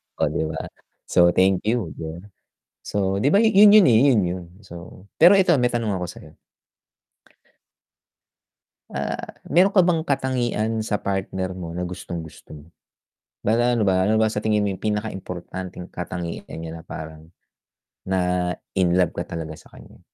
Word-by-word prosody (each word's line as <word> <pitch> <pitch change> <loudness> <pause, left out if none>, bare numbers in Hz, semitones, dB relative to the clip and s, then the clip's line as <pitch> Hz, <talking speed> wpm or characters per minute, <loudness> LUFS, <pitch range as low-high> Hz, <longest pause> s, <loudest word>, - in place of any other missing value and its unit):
Oh, - - 0
di 80 - -1
ba? 80 - -5 0.6
So 85 - +6
thank 95 0 +3
you 110 -7 0
dun, 85 +5 -8 0.5
so 95 -1 -1
diba 150 +10 +4
yun 210 -2 +7
yon 210 -5 +7
eh, 115 -3 +5
yun 120 - +3
yon 90 0 -5
so 90 0 -12
pero 185 +4 +7
eto 180 -3 +4
may 125 -2 +1
tanong 110 -4 -1
ako 90 - -3
sa'yo. 75 -2 -14 2.6
Ah, - - -3 0.3
meron 185 +4 +4
ka 200 - +3
bang 170 -3 +3
katangian 120 -6 -1
sa 105 -1 -2
partner 95 -1 -3
mo 85 -3 -7
na 90 +1 -4
gustong-gusto 85 -3 -8
mo? 75 0 -11 0.8
Ano 115 0 +2
ba 95 0 +2
ano 110 - +3
ba 110 - +3
sa 105 - -2
tingin 105 -1 +1
mo - - 0
yung 95 - -9
pinaka-importanteng 95 -4 -5
katangian 90 -1 -5 0.2
niya 80 0 -7
na - - -14
parang, 80 -1 -9 0.8
na-inlove 90 -1 0
ka - - -1
talaga 80 -1 -6
sa - - -18
kanya? - - -15
95 Hz, 150 wpm, -23 LUFS, 90-120 Hz, 2.6 s, yun